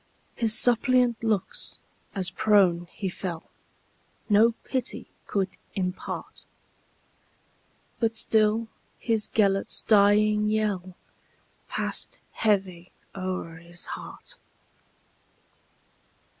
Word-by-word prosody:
His 225 -2 +1
suppliant 245 -1 +3
looks, 225 - -1 0.4
as 185 -2 -1
prone 195 -5 +3
he 200 - -4
fell, 180 -2 -4 0.9
No 220 +3 +5
pity 260 -2 -3 0.2
could 195 -2 0 0.3
impart; 180 -1 -4 1.5
But 225 -1 +1
still 220 +1 +3 0.3
his 225 -2 0
Gêlert's 195 -2 +2
dying 210 0 +4
yellPassed 200 -4 -4
heavy 190 -5 0 0.2
o'er 185 -3 -4
his 170 +1 -9
heart. - - -9
210 Hz, 75 wpm, -27 LUFS, 185-220 Hz, 1.5 s, No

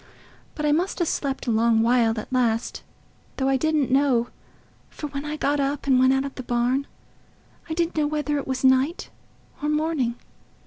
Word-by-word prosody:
But 300 - -3
I 295 - +3
must 345 +6 0
have 345 - 0
slept 275 -3 -2
a 240 - 0
long 225 0 +3
while 230 -2 +2
at 235 - -8
last, 235 -2 0 0.6
though 265 - 0
I 270 - +3
didn't 300 -1 +1
know, 260 -3 +2 0.6
for - - -8
when 285 0 -5
I 300 +1 -4
got 290 -1 0
up 280 +1 -1
and 265 -2 +4
went 260 0 +5
out 270 +1 +1
of 275 - -6
the - - -7
barn, 245 +3 0 0.8
I 320 - -2
didn't 340 0 -1
know 300 -1 +2
whether 295 -1 -1
it - - -7
was 260 0 -3
night 265 +6 +2 0.5
or 295 - -1
morning. 300 -6 0
275 Hz, 190 wpm, -24 LUFS, 250-300 Hz, 0.8 s, went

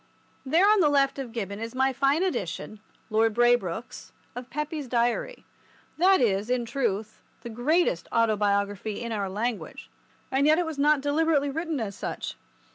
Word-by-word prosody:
There 330 +9 +3
on 425 0 +5
the 310 -5 +4
left 275 -1 +2
of 255 -4 -5
Gibbon 200 -3 -5
is 225 +2 -6
my 265 +1 +2
fine 275 +6 +2
edition 210 - -3 0.3
(Lord 220 0 +2
Braybrooke's) 240 -3 0 0.2
of 245 +1 -7
Pepys' 300 0 -4
Diary. 240 - -1 0.5
That 380 +2 +5
is, 210 -3 +1
in 250 -1 0
truth, 220 -4 -2 0.2
the 235 - -6
greatest 245 - +1
autobiography 205 -2 0
in 235 -1 -5
our 200 -3 -2
language, 220 +3 -4 0.4
and 270 +2 +2
yet 310 +1 +5
it 355 - +1
was 320 -3 -5
not 295 0 +3
deliberately 290 0 +1
written 320 0 -3
as 210 -3 -3
such. - - -5
245 Hz, 160 wpm, -26 LUFS, 220-295 Hz, 0.5 s, on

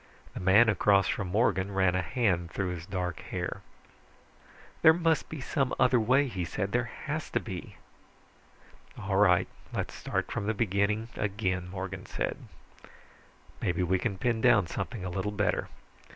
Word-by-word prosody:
The - - -6
man 95 +6 +5
across 100 -1 +4
from 100 - -2
Morgan 100 -1 +1
ran 95 -2 +2
a 95 - +1
hand 90 -4 0
through 95 +1 -2
his 85 -1 -6
dark 90 -3 -3
hair. - - -4 1.2
"There 160 - +8
must 165 -1 +1
be 155 - -6
some 135 0 -1
other 125 -1 +4
way," 130 +6 +3
he 95 -8 -3
said. 95 +3 -3
"There 120 0 0 0.2
has 155 +1 -3
to - - 0
be." 95 -5 -7 1.2
"All 95 0 -1
right, 90 -3 +4 0.2
let's - - -3
start - - -3
from 100 - -3
the 110 - 0
beginning 105 +1 0
again," 95 -3 -2
Morgan 95 0 -6
said. - - -2 1.2
"Maybe 90 0 0
we 90 +1 +1
can 100 -1 -2
pin 115 +3 0 0.2
something 110 +5 -5
down 95 - -4
a - - -7
little 100 +2 -1
better. 105 -1 0
100 Hz, 160 wpm, -29 LUFS, 95-115 Hz, 1.2 s, There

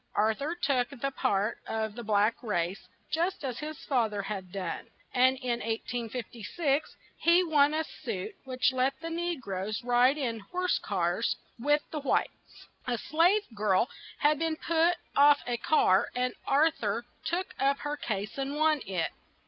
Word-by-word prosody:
Ar 220 +1 +3
thur 290 +8 -3
took 275 -7 +1
the 275 0 -3
part 205 -3 0
of 220 -1 -2
the 240 +2 -7
black 210 +1 +2
race, 190 -5 -2 0.2
just 335 +2 0
as 250 -3 -3
his 305 0 -5
fa 245 -6 +2
ther 205 -1 -3
had 195 -3 -5
done, 185 -3 -4 0.3
and 260 +1 +4
in 245 -3 -1
1856, 240 - -2 0.2
he 340 +2 +5
won 300 -3 +4
a 315 - +1
suit 420 +6 -5
which 255 0 +1
let 260 +1 +1
the 330 0 -5
ne 345 0 -1
groes 205 -2 -4
ride 245 +3 +4
in 235 -6 -2
horse 360 - -1
cars 180 +2 0 0.2
with 295 +4 +2
the 310 - -2
whites. 275 - -2 0.2
A 245 -1 0
slave 345 - +3
girl 210 +2 +2 0.3
had 295 0 +3
been 325 -1 0
put 335 +2 +2 0.2
off 285 +1 +6
a 245 -1 -1
car 205 -8 +3
and 250 0 0
Ar 300 +4 +5
thur 230 -6 -2 0.2
took 345 +4 -2
up 275 +1 +3
her 295 0 -2
case 210 -4 -4
and 275 +1 -2
won 310 -1 +3
it. 180 -4 -1
260 Hz, 165 wpm, -29 LUFS, 220-310 Hz, 0.3 s, off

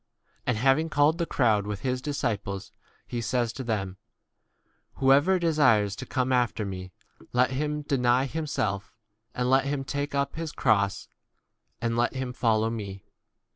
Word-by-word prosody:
And 125 - +1
having 135 +7 +3
called 150 +3 +3
the 170 - 0
crowd 110 -6 +2
with 105 -1 -4
his 125 0 -1
disciples, 105 -9 -3 0.3
he 120 - -4
says 120 -1 0
to 130 - -6
them, 95 -5 -2 1.0
Whoever 140 +8 +4
desires 130 - +3
to - - -7
come 130 -1 0
after 120 -3 +1
me, 95 -1 -6 0.4
let 125 +1 +3
him 150 +2 -2
deny 130 -3 +2
himself, 130 -9 -2 0.4
and 125 0 0
let 135 +1 +4
him 140 -1 -1
take 145 +1 -3
up 140 +2 -1
his 165 -2 -3
cross 100 -2 +1 0.7
and 115 -1 -1
35 - - -2
let 120 - +1
him 130 -1 -3
follow 110 -2 +1
me. 100 -4 -6
125 Hz, 155 wpm, -27 LUFS, 110-140 Hz, 1.0 s, Whoever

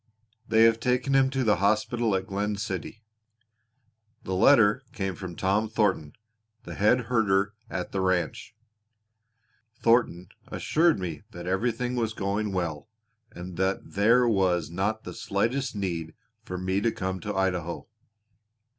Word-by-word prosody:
They 110 0 +4
have 115 0 +5
taken 125 +3 0
him 135 -1 +4
to 135 -1 -1
the 105 -5 +3
hospital 110 +3 +1
at 95 - -2
Glen 105 +1 -2
City. 100 +2 -5 1.2
The 95 - -4
letter 105 +5 +5
came 95 -5 -2
from 90 0 -8
Tom 100 +5 0
Thornton, 95 -9 0 0.5
the - - -8
head 110 +5 +3
herder 105 -4 +1 0.2
at 90 - -4
the 95 - -1
ranch. 95 +4 -1 1.2
Thornton 115 -8 +1 0.2
assured 165 +1 +2
me 85 -6 -5
that 85 -5 -9
everything 120 +6 -1
was 115 -3 -1
going 100 +1 -2
well, 85 -2 -3 0.4
and 90 0 -9
that 95 +1 -1
there 115 +5 +4
was 90 -7 +1
not 100 +5 -1
the - - -7
slightest 115 +5 -1
need 85 -5 -3 0.3
for 90 - -6
me 95 +2 -1
to 115 - +1
come 95 -1 -3
to 105 +3 -5
Idaho." 90 -3 -2
100 Hz, 140 wpm, -27 LUFS, 95-115 Hz, 1.2 s, have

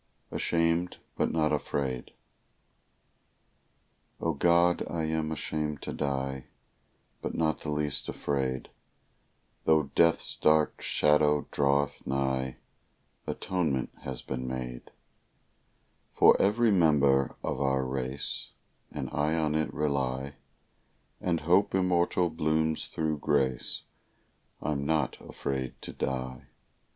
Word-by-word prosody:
"ASHAMED, 85 +1 +1 0.2
BUT - - +1
NOT 75 -2 +1
AFRAID" 70 -4 -2 2.1
O 80 - 0
God, 85 +3 +4
I 85 -2 -2
am 80 0 -1
ashamed 75 -2 -3
to - - -4
die, 65 -1 -2 0.8
But - - -4
not 80 -3 +1
the - - -5
least 75 -1 0
afraid; 65 -2 -2 0.9
Tho' 80 -3 +3
death's 85 -1 +3
dark 75 0 +3
shadow 75 0 +3
draweth 70 -1 +1
nigh, 65 -1 -1 0.7
Atonement 80 -8 -1
has 65 -2 -5
been 65 -1 -4
made 60 -1 -5 1.3
For - - +7
every 110 +3 +3
member 70 -7 +4
of - - -2
our 65 -1 +1
race, 65 +1 -2 0.4
And 70 -3 -4
I 75 +2 +1
on 80 -2 +1
it 80 0 0
rely, 70 -2 -1 0.9
And 85 -3 0
hope 90 +6 +3
immortal 90 -2 +2
blooms 80 0 0
thro' 80 -1 -1
grace; 65 -3 0 0.8
I'm 70 -2 -1
not 80 +1 0
afraid 65 -2 -4
to - - -6
die. 65 -2 -4
75 Hz, 105 wpm, -29 LUFS, 65-80 Hz, 2.1 s, For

